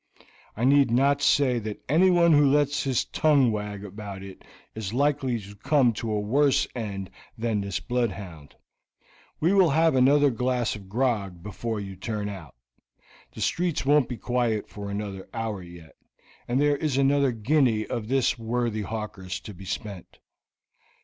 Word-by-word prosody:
I 115 - -2
need 140 0 +5
not 140 +4 +2
say 130 -4 +3
that 110 -1 -7
anyone 170 +3 +4
who 145 -1 +5
lets 145 +1 +2
his 130 -3 +1
tongue 140 -6 +3
wag 105 -1 -5
about 100 -1 -8
it 95 -1 -11 0.3
is 110 0 -5
likely 135 -3 +1
to 100 0 -12
come 130 +2 +2
to 110 +1 -4
a 105 - 0
worse 135 +6 +2
end 100 -5 -5 0.3
than 110 -2 -1
this 100 -1 -3
bloodhound. 100 - -4 0.8
We 170 +5 +2
will 190 -4 +5
have 160 +2 +3
another 140 +2 +4
glass 125 -1 -1
of 100 -3 -12
grog 105 -7 -1
before 105 +2 -4
you 95 -1 -7
turn 105 +2 -4
out; 90 -11 -9 0.8
the - - -8
streets 175 -5 0
won't 145 -1 +3
be 125 - -4
quiet 120 -4 -1
for 100 -1 -8
another 100 -2 -5
hour 110 -4 -3
yet, 85 -3 -13 0.5
and 125 +2 0
there 145 0 +3
is 145 -3 -1
another 140 0 +3
guinea 115 -1 +1
of 110 -2 -4
this 130 -1 +1
worthy 115 -1 -1
hawker's 105 -4 -5
to 105 - -9
be 95 +1 -12
spent. 95 0 -6
115 Hz, 160 wpm, -26 LUFS, 105-140 Hz, 0.8 s, need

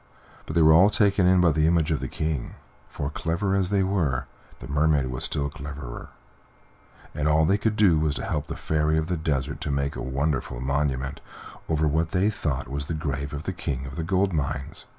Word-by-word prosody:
But 80 - -5
they 85 - +5
were 80 0 +7
all 95 +6 +7
taken 100 -3 +3
in 90 0 +5
by 85 -2 +5
the 75 +1 +2
image 80 -2 +2
of 75 - +1
the - - -4
King, 75 -5 -3 0.3
for, 70 0 -4
clever 85 +6 -1
as 95 -2 +1
they 100 -1 +2
were, 85 -10 0 0.3
the - - -10
Mermaid 70 -2 +2
was 65 - -2
still 70 -1 -1
cleverer, 70 -3 -8 1.0
and 75 0 -1
all 80 +1 +4
they 100 +5 +2
could 110 0 0
do 95 -7 +4
was 75 -2 0
to - - -4
help 75 0 -2
the - - -5
Fairy 80 0 0
of 80 - +1
the 90 - +1
Desert 70 -3 -2
to - - -3
make 70 0 -1
a - - -5
wonderful 65 -1 -2
monument 70 0 -1 0.5
over 80 -1 +2
what 80 +2 0
they 100 +3 +2
thought 75 - -2
was 70 +3 -4
the 80 - -2
grave 70 -1 -3
of 75 +1 -5
the - - -3
King 65 -1 -3
of 65 +1 -8
the 80 - -3
Gold 95 +2 +1
Mines. 70 -2 -3
75 Hz, 215 wpm, -25 LUFS, 70-85 Hz, 1.0 s, were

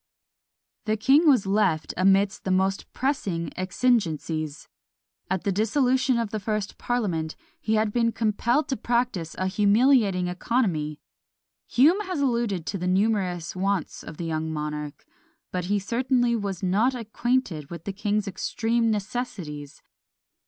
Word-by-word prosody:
The 215 0 0
king 275 +9 +4
was 255 -8 +4
left 195 -5 +1
amidst 195 +1 +3
the - - -3
most 190 +1 0
pressing 200 - -2
exigencies. 165 - -1 0.6
At 190 -1 -1
the 200 - +1
dissolution 255 +5 +2
of 230 -3 -2
the 215 - -2
first 210 -1 -3
parliament 180 -10 -1 0.2
he 220 - 0
had 215 -1 +1
been 230 -1 +2
compelled 235 +6 +1
to 265 - -1
practise 235 -9 -1
a 185 - -1
humiliating 205 -1 +3
economy. 180 - -1 0.7
Hume 310 - +4
has 365 -5 -2
alluded 235 - 0
to 195 - -3
the 180 - -2
numerous 185 -4 0
wants 195 -2 -1
of 155 - -9
the 170 - -4
young 160 -1 -2
monarch; 150 -1 -5 0.5
but 180 -1 -2
he 205 +3 +1
certainly 240 +3 +1
was 200 -4 -3
not 215 +8 +2
acquainted 230 - -1
with 170 -1 -8
the 200 - -4
king's 205 +1 -1
extreme 230 +4 0
necessities. 195 - -4
205 Hz, 140 wpm, -25 LUFS, 180-235 Hz, 0.7 s, king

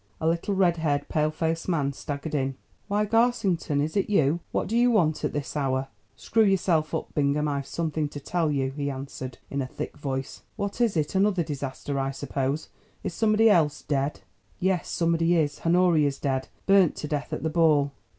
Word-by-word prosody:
A - - -3
little 170 +4 0
red 180 -3 +3
haired, 145 -3 0
pale 155 0 +1
faced 165 +2 -2
man 145 -5 0
staggered 145 +3 -5
in. 135 -2 0 0.3
"Why, 210 +1 +1
Garsington, 200 -9 +1
is 155 +5 -2
it 200 - +1
you? 165 -5 +3
What - - -1
do 220 - -2
you 240 +1 +5
want 165 -9 +2
at - - 0
this 145 0 -4
hour?" 135 -2 0 0.3
"Screw 225 -1 +2
yourself 175 -6 +2
up, - - -4
Bingham, 145 +1 +1
I've 140 -1 -2
something 155 -2 -2
to 145 - -7
tell 165 +1 0
you," 135 -2 0
he 140 0 -3
answered 130 -1 -6
in 140 - -1
a 130 - -3
thick - - -6
voice. 135 -2 -4
"What 205 +2 -3
is 225 -7 +2
it? 150 -1 0
another 190 -2 +2
disaster, 140 -1 -4
I 135 0 0
suppose. 135 +1 -3 0.3
Is - - -3
somebody 220 +2 +3
else 160 -8 +3
dead?" 140 0 -1 0.4
"Yes; 185 -2 0
somebody 165 0 +2
is. 150 -3 0
Honoria's 165 -5 +3
dead. 130 -1 -1 0.2
Burnt 195 -4 +5
to 150 - -5
death 145 -1 -3
at - - -3
the 160 - 0
ball." 155 -4 +3
155 Hz, 190 wpm, -26 LUFS, 140-180 Hz, 0.4 s, you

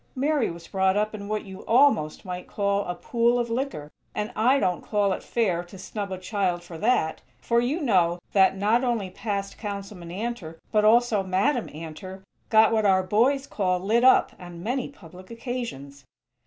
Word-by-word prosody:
_ - - -40
Mary 285 -1 +1
was 170 0 -9
brought 190 0 +1
up 215 +1 0
in 200 -1 -7
what 215 +1 -2
you 190 0 -10
almost 230 - +3
might 180 -1 -6
call 200 0 0
a 175 - -3
pool 235 +6 +1
of 235 -1 -1
liquor, 230 - -3 0.2
and 210 +2 -2
I 250 +6 +4
don't 180 -9 0
call 205 -2 +1
it - - -5
fair 185 -7 0
to 185 +2 -13
snub 200 +1 -5
a 185 - -3
child 185 -2 -1
for 175 -1 -10
that; 215 -7 +1 0.2
for 235 0 +1
you 270 +8 -1
know 180 - +2 0.2
that, 195 -1 +4
not 215 +5 +2
only 230 -7 -1
'Past' 200 -1 -4
Councilman 200 -4 -6
Antor, 195 -4 -5
but 215 -1 +3
also 225 -1 +4
Madam 195 +7 0
Antor, 175 +5 -9 0.3
got 220 0 +6
what 220 -1 +2
our 190 -2 +4
boys 245 +9 +2
call 185 -7 0
'lit 220 +6 +1
up' 260 - +5
on 175 -1 -10
many 250 +4 -2
public 185 - -14
occasions. 230 - -6
205 Hz, 185 wpm, -25 LUFS, 185-235 Hz, 0.3 s, got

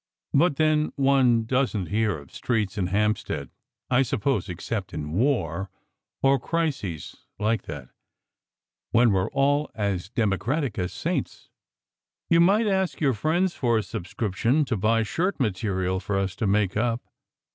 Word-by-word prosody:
But 155 +1 +4
then, 155 0 +2
one 135 -4 +3
doesn 125 -5 0
t 80 - -12
hear 105 -3 +1
of 70 -2 -14
streets 110 -5 -1
in 95 -4 -1
Hampstead, 100 - -1 0.4
I 125 +1 +5
suppose, 130 -5 0
except 95 +3 -4
in 75 -1 -4
war, 95 - 0 0.5
or 135 0 +4
crises 135 - -3
like 110 0 +1
that, 70 -4 -7 1.0
when 115 -2 +4
we 95 - +3
re 95 - 0
all 145 +1 +2
as 100 -4 -2
democratic 115 - -1
as 90 0 -2
saints. - - -3 0.8
You 170 - +6
might 200 +6 +4
ask 190 -3 0
your 140 -4 +2
friends 170 - +1
for 120 -3 +1
a 110 - 0
subscription 110 - -1
to 125 - -1
buy 110 +3 +2
shirt 175 - -1
material 95 -5 0
for 100 +1 -2
us 95 -1 -1
to 110 - 0
make 100 -1 +1
up. 115 +2 0
110 Hz, 150 wpm, -25 LUFS, 95-140 Hz, 1.0 s, You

